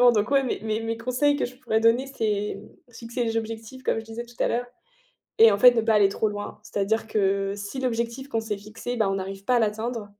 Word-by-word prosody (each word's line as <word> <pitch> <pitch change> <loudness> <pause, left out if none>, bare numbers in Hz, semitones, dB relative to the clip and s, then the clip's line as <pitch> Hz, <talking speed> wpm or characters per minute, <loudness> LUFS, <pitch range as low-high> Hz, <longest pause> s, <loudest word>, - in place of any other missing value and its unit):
Exactement, 245 -1 +7
donc 215 +3 0
ouais, 275 -1 +4
mes 250 - -2
mes 220 0 -1
mes 225 0 -3
conseils 255 +5 +1
que - - 0
je 250 - -11
pourrais 220 -4 0
donner, 230 +4 +3
c'est 210 -6 -2 0.3
fixer 235 +1 -4
les 225 0 -1
objectifs, 225 +3 -5
comme 225 - 0
je 225 - -12
disais 225 +2 -6
tout 240 0 -17
à - - +3
l'heure, 245 +1 -1 0.7
et 225 -1 +8
en 200 - +1
fait, 250 +2 +9
ne 230 - +3
pas 220 0 +2
aller 200 -2 +5
trop 215 +2 0
loin. 205 0 -6
C'est-à-dire 220 +3 -1
que 195 -1 +1
si 205 +6 -6
l'objectif 245 +2 -2
qu'on 225 -2 -1
s'est 215 -2 -3
fixé, 220 +4 -6
ben, 220 -4 +2
on 195 - 0
n'arrive 195 +1 -5
pas 250 - +3
à - - +4
l'atteindre 220 0 -2
225 Hz, 245 wpm, -25 LUFS, 210-240 Hz, 0.7 s, fait